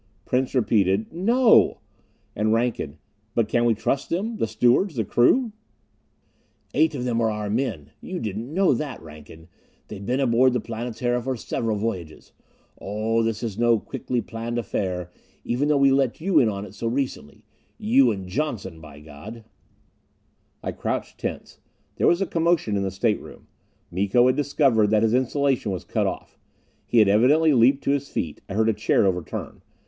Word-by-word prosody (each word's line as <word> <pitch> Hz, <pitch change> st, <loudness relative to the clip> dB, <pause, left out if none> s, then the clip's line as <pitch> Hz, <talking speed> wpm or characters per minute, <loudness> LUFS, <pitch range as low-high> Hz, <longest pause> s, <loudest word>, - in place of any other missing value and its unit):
Prince 130 Hz, +1 st, -1 dB
repeated: 105 Hz, -2 st, +1 dB
"No!" 230 Hz, +7 st, +4 dB, 0.6 s
And 110 Hz, +1 st, +1 dB
Rankin: 115 Hz, -10 st, -1 dB, 0.4 s
"But 115 Hz, -2 st, +2 dB
can 120 Hz, +1 st, +1 dB
we 115 Hz, -2 st, +3 dB
trust 135 Hz, +5 st, -2 dB
them? 215 Hz, +7 st, -2 dB
The 115 Hz, -, 0 dB
stewards 120 Hz, -, +2 dB
the 110 Hz, -3 st, -1 dB
crew?" 225 Hz, -, +3 dB, 1.2 s
"Eight 155 Hz, -1 st, +2 dB
of 125 Hz, -2 st, -3 dB
them 115 Hz, -2 st, 0 dB
are 110 Hz, -, +2 dB
our 105 Hz, -1 st, -3 dB
own 105 Hz, +1 st, -1 dB
men! 110 Hz, -, -3 dB
You 180 Hz, -1 st, -5 dB
didn't 110 Hz, +4 st, -5 dB
know 190 Hz, +3 st, +3 dB
that, 145 Hz, -6 st, -4 dB
Rankin? 80 Hz, +1 st, -13 dB, 0.4 s
They've 100 Hz, -2 st, -8 dB
been 125 Hz, +6 st, -1 dB
aboard 130 Hz, -1 st, +3 dB
the 125 Hz, -, +1 dB
Planetara 120 Hz, +2 st, -3 dB
for 130 Hz, +2 st, -2 dB
several 110 Hz, -1 st, -2 dB
voyages. 95 Hz, -8 st, -5 dB, 0.5 s
Oh, 110 Hz, +3 st, -1 dB
this 115 Hz, 0 st, -2 dB
is 110 Hz, -2 st, -4 dB
no 120 Hz, -1 st, +4 dB
quickly 120 Hz, +3 st, -3 dB
planned 115 Hz, +2 st, -5 dB
affair, 90 Hz, -6 st, -3 dB, 0.3 s
even 130 Hz, +5 st, 0 dB
though 150 Hz, -1 st, +3 dB
we 140 Hz, -1 st, +4 dB
let 135 Hz, -3 st, +1 dB
you 185 Hz, +3 st, +3 dB
in 115 Hz, -, +3 dB
on 100 Hz, -1 st, -4 dB
it -, -, -12 dB
so 115 Hz, -, -4 dB
recently. 125 Hz, -, -4 dB, 0.3 s
You 125 Hz, +4 st, +4 dB
and 95 Hz, -4 st, -4 dB
Johnson. 95 Hz, -, -4 dB
By 75 Hz, -2 st, -13 dB
God!" 80 Hz, +10 st, -11 dB, 1.2 s
I -, -, -2 dB
crouched -, -, -4 dB
tense. -, -, -6 dB, 0.4 s
There -, -, +2 dB
was 175 Hz, +2 st, +3 dB
a -, -, -1 dB
commotion 165 Hz, -, +1 dB
in 100 Hz, -, 0 dB
the 95 Hz, -, -1 dB
stateroom. 105 Hz, +3 st, -3 dB, 0.5 s
Miko 100 Hz, +7 st, +2 dB
had 130 Hz, -, +3 dB
discovered 135 Hz, -7 st, +2 dB
that 110 Hz, 0 st, +3 dB
his 110 Hz, 0 st, +2 dB
insulation 130 Hz, -2 st, +1 dB
was 95 Hz, -, -4 dB
cut -, -, -1 dB
off! -, -, -6 dB, 0.5 s
He -, -, 0 dB
had 110 Hz, -2 st, +6 dB
evidently 145 Hz, +10 st, +4 dB
leaped 130 Hz, +3 st, +4 dB
to -, -, +1 dB
his 140 Hz, 0 st, -1 dB
feet; 80 Hz, -3 st, -4 dB
I 100 Hz, -, -5 dB
heard 110 Hz, +1 st, +2 dB
a -, -, +2 dB
chair 105 Hz, 0 st, +2 dB
overturn. 90 Hz, -3 st, -3 dB
115 Hz, 175 wpm, -24 LUFS, 105-135 Hz, 1.2 s, had